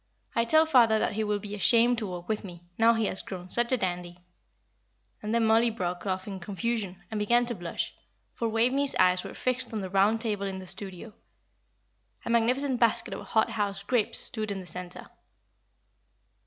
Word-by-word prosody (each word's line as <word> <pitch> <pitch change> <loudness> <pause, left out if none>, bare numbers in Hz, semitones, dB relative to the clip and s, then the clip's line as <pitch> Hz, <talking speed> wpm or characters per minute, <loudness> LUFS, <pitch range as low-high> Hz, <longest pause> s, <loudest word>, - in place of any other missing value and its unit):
I 230 - +1
tell 315 +6 +5
father 240 -8 +5
that 215 - 0
he 220 +1 -1
will 210 -1 0
be 205 0 -8
ashamed 235 +3 +4
to 215 - -3
walk 175 -1 -7
with 215 0 -2
me, 175 -3 -10
now 225 +2 +5
he 225 -1 +1
has 190 - 0
grown 180 -1 -8
such 240 +1 +1
a 255 - +3
dandy." 175 -3 -3 1.0
And 210 - -4
then 230 0 +2
Mollie 225 +2 +4
broke 180 -4 -4
off 185 0 -2
in 195 -2 -5
confusion, 200 0 -3
and 215 - -2
began 240 +4 +3
to 240 - -2
blush, 175 -5 -4 0.4
for 230 - -2
Waveney's 255 +5 +1
eyes 180 0 +3
were - - -8
fixed 255 0 -1
on 215 - -2
the 190 -1 -6
round 200 +3 +3
table 210 -4 -2
in 190 -1 -4
the 190 - -8
studio. 195 +3 -4 1.1
A - - -2
magnificent 250 +3 +2
basket 235 -2 +2
of - - -6
hot 220 0 +2
house 200 -3 -2
grapes 220 0 +1
stood 215 -2 -3
in 200 -1 -3
the 185 - -9
centre. 180 0 -6
215 Hz, 195 wpm, -28 LUFS, 190-235 Hz, 1.1 s, tell